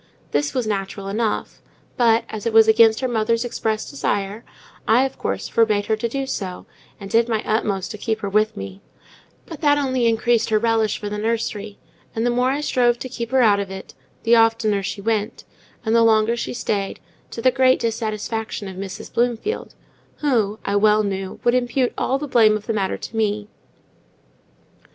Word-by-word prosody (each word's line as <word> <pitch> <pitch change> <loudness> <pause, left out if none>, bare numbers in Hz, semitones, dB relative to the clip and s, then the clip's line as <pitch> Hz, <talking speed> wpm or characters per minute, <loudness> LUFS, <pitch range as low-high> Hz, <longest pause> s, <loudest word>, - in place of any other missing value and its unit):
This 145 0 0
was 250 -3 0
natural 195 -1 -3
enough, 215 +1 -2 0.3
but, 230 -2 +3
as 215 +1 -5
it 230 - -1
was 220 0 +7
against 220 +1 +5
her 260 - 0
mother's 230 0 0
express 220 -2 -2
desire, 205 -6 -2 0.4
I, 245 +4 +4
of 270 - -6
course, - - -3
forbade 215 -3 +2
her 220 - +1
to 235 +2 -2
do 275 +3 -2
so, 190 -8 -5 0.3
and 200 - -8
did 230 +3 +2
my 220 -2 0
utmost 205 -3 -1
to 215 - -8
keep 220 -1 -2
her 200 - -2
with 215 +2 +1
me; 95 0 -7 0.6
but 325 - -10
that 290 -2 +4
only 260 -4 +1
increased 230 0 +2
her 215 - +3
relish 225 -1 +1
for 210 - -6
the 210 0 -4
nursery, 215 -2 -2 0.4
and 225 +1 0
the 245 - +2
more 250 +1 +2
I 280 +2 -1
strove 245 -4 +2
to 260 - -7
keep 235 -2 -5
her 260 0 +3
out 205 -3 +4
of 200 -1 -3
it, 190 0 -9 0.3
the 235 +1 +5
oftener 225 -3 +3
she 195 +1 -5
went, 220 +1 -2 0.4
and 220 +1 +2
the 230 - +5
longer 225 0 +4
she 235 - -4
stayed, 200 -4 -2 0.3
to - - -8
the 255 +3 +4
great 260 0 +3
dissatisfaction 220 -1 -3
of 190 -1 -8
Mrs. 195 0 -7
Bloomfield, 240 - -1 0.5
who, 225 -8 +1
I 200 0 +1
well 210 +1 +4
knew, 195 -1 -4
would 240 - +3
impute 250 0 +1
all 265 - 0
the 295 +1 -5
blame 220 -4 +4
of 210 - -12
the 225 - -1
matter 195 -3 -1
to - - -9
me. 210 -1 -1
220 Hz, 190 wpm, -21 LUFS, 210-240 Hz, 0.6 s, was